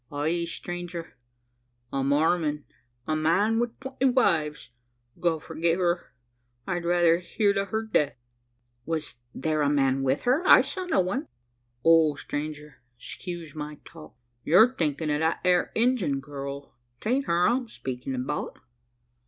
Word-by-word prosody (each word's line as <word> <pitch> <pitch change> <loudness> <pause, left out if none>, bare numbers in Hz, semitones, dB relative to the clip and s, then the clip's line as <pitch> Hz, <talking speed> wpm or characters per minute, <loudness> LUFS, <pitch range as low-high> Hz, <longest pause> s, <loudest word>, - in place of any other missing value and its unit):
"Ay, 160 +4 -1
stranger, 175 0 -6 0.8
a 135 -1 0
Mormon 150 +1 +1 0.4
a 155 - 0
man 200 +9 +2
wi' 240 - +2
twenty 265 0 -3
wives! 165 - +1 0.5
God 165 -3 0
forgi' 165 0 0
her! 175 -5 -1 0.5
I'd 175 -2 -2
rather 170 -1 +4
heerd 200 +3 +1
o' 195 - 0
her 220 +3 -2
death!" 150 -11 0 0.7
"Was 155 -4 -3 0.2
there 155 -1 0
a 145 - +3
man 135 -2 +2
with 135 +1 0
her? 255 +6 +3
I - - +8
saw 375 -1 -4
no 325 - +2
one." 245 - -2 0.6
"O 165 -2 +5
stranger, 150 +1 -6 0.2
excuse 170 +4 -7
my 150 -1 -6
talk 160 -2 -13 0.3
you're 220 - +6
thinkin' 155 - -1
o' 150 - +1
that 160 +1 +1
ere 180 -1 +3
Injun 225 - +1
girl. 140 0 -7 0.3
'Taint 260 +5 0
her 175 -3 +3
I'm 245 +2 +1
speakin' 130 - -5
about." 130 +4 -3
165 Hz, 140 wpm, -26 LUFS, 150-190 Hz, 0.8 s, I